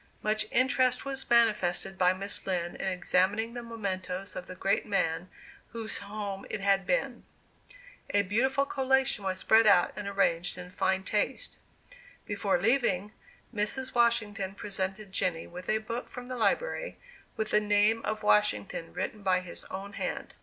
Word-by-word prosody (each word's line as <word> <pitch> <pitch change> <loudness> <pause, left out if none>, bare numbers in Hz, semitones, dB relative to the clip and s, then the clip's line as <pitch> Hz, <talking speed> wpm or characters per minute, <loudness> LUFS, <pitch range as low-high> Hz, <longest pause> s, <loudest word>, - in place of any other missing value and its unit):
Much 215 0 +1
interest 255 +1 +3
was 270 -1 -5
manifested 210 -5 +3
by 180 -1 +4
Miss 195 +2 -2
Lind 175 -2 -1
in - - -3
examining 190 +4 +1
the 240 - -5
mementoes 195 -4 -4
of 180 - -6
the 185 - -8
great 195 +2 +1
man 180 -3 -1 0.4
whose 225 -1 -3
home 200 -1 -5
it 220 - -3
had 195 0 +2
been. - - 0 0.9
A 205 0 +3
beautiful 265 +8 +1
collation 265 -5 +1
was 190 -1 -1
spread 220 +3 +5
out 180 -4 +5
and 205 0 -5
arranged 180 -3 +1
in 180 0 -8
fine 190 0 0
taste. 210 +1 -2 0.7
Before 200 -3 0
leaving, 210 -2 +1 0.4
Mrs. 230 +5 -1
Washington 210 -5 +1
presented 195 0 -4
Jenny 175 -3 0
with 180 +1 -9
a 215 - +3
book 230 +3 -5
from 250 0 -9
the 255 - -3
library, - - 0 0.4
with 220 -1 -2
the 210 - +5
name 210 +2 +3
of 215 0 -3
Washington 105 +8 +1
written 210 - -4
by 185 -2 +2
his 185 - -5
own 195 +2 -7
hand. - - -4
205 Hz, 155 wpm, -29 LUFS, 185-225 Hz, 0.9 s, spread